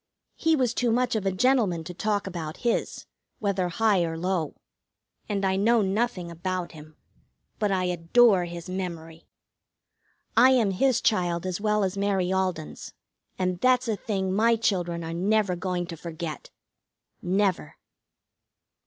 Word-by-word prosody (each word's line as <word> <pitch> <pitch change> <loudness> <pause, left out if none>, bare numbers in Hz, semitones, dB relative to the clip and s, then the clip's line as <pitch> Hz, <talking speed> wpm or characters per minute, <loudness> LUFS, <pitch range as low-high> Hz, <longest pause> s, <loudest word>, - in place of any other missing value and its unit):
He 325 0 +2
was 250 -5 +1
too 245 -2 +1
much 250 +1 +1
of 205 -3 -1
a - - +2
gentleman 200 -5 +2
to 180 +2 -7
talk 205 +2 -1
about 165 -5 -5
his, 235 - -1 0.3
whether 195 -3 -1
high 205 0 +2
or 165 -1 -3
low, 175 -2 -2 0.7
and 200 -2 -1
I 190 0 +1
know 225 +2 +3
nothing 195 -3 -1
about 180 +1 -3
him. 155 -1 -14 0.6
But 210 -2 +1
I 185 -1 +1
adore 180 +3 +3
his 170 0 -8
memory! 170 -3 -6 1.1
I 255 +3 +7
am 225 -6 +3
his 255 +6 +2
child 175 -5 +1
as 185 +1 -3
well 210 -1 +1
as 190 +1 -2
Mary 190 -2 +1
Alden's, 185 -4 -3 0.4
and 180 -1 -1
that's 255 +1 +3
a 220 - 0
thing 190 -3 -2
my 230 +3 +4
children 175 -6 -1
are 165 0 -5
never 195 +2 +1
going 180 0 -2
to 170 -1 -7
forget. 165 -1 -7 0.7
Never. 185 -4 0
190 Hz, 150 wpm, -26 LUFS, 175-215 Hz, 1.1 s, I